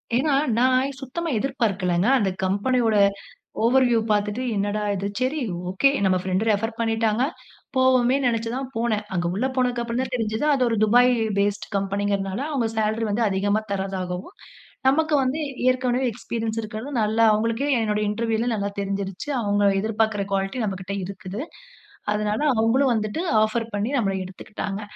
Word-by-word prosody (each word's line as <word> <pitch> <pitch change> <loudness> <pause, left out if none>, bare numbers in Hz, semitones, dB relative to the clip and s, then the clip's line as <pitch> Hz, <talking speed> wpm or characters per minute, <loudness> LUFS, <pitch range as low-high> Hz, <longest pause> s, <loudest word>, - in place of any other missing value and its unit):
ஏன்னா 275 +4 +2 0.2
நான் 255 +1 +4
இ - - -5
சுத்தமா 325 +6 -4
எதிர்பார்க்கல்லங்க. 205 -8 0
அந்த 205 -5 +1
கம்பெனியோட 220 +4 +1 0.7
ஓவர் 255 +3 +4
வியூ 230 -2 +3
பாத்துட்டு, 210 +2 0
என்னடா 205 +1 -1
இது? 195 +1 -2
சரி 260 +5 0 0.3
ஓகே 195 +9 +3 0.2
நம்ம 185 -1 +3
பிரெண்ட்டு 190 +4 0
ரெஃபர் 225 +2 0
பண்ணிட்டாங்க 225 +1 +1 0.5
போவோமேன் 260 +1 +3
நெனச்சு 230 -1 -1
தான் 265 -1 -4
போனேன். 225 -2 0
அங்க 175 -1 -1
உள்ளே 260 +6 0
போனதுக்கு 250 -2 +1
அப்புறம் 235 +1 -2
தான் 260 0 -6
தெரிஞ்சது. 220 +2 -1
அது 255 -2 +2
ஒரு 230 - 0
துபாய் 245 +3 +5 0.3
பேஸ்டு 200 0 -1
கம்பெனிங்றதனால, 195 0 -1
அவுங்க 245 -6 0
சேலரி 220 +1 0
வந்து 230 +3 +1
அதிகமா 205 +2 +1
தர்றதாகவும், 190 - -4 0.5
நமக்கு 310 +3 +1
வந்து 260 +4 -1 0.3
ஏற்கனவே 255 0 +1
எக்ஸ்பீரியன்ஸ் 225 0 -3
இருக்றது 215 +4 -6
நல்லா 220 +2 +2
அவங்களுக்கே, 230 +6 0
என்னுடைய 210 -1 0
இன்டர்வியூல 230 +2 -1
நல்லா 200 -1 -2
தெரிஞ்சிருச்சு. 195 +4 -4
அவுங்க 205 -1 +1 0.2
எதிர்பாக்ற 220 -1 0
குவாலிட்டி 195 +5 -1
நம்மகிட்ட 190 -1 -4
இருக்குது. 200 +2 -6 0.7
அதனால 210 +2 0 0.2
அவுங்களும் 240 +5 +3
வந்துட்டு, 215 +6 -2 0.2
ஆஃபர் 220 +2 +1
பண்ணி 205 +3 -1
நம்மள 205 -7 +1
எடுத்துக்கிட்டாங்க. 195 +2 -6
220 Hz, 145 wpm, -24 LUFS, 200-245 Hz, 0.7 s, துபாய்